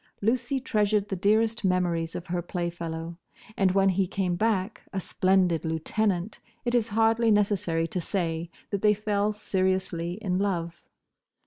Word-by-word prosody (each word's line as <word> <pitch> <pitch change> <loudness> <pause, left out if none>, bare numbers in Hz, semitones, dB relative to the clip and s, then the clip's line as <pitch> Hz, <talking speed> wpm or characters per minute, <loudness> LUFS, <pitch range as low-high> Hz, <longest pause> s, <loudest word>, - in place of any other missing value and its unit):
Lucy 250 +5 0
treasured 210 -4 +1
the 195 - -1
dearest 220 +5 +2
memories 175 -3 0
of 175 - -5
her 175 -1 -2
playfellow, 170 -1 -4 0.4
and 190 -2 +2
when 195 0 +4
he 190 0 +1
came 185 -2 -1
back, 215 +1 0
a 195 - -2
splendid 185 -2 +2
lieutenant, 175 +4 -1 0.3
it 240 - 0
is 235 -2 +2
hardly 225 +1 +3
necessary 195 -6 +2
to 180 +2 -3
say 165 -2 -2 0.2
that 200 -2 -1
they 210 0 +4
fell 210 0 0
seriously 185 -4 -1
in 185 -2 -2
love. 170 -4 -2
190 Hz, 145 wpm, -27 LUFS, 175-210 Hz, 0.4 s, when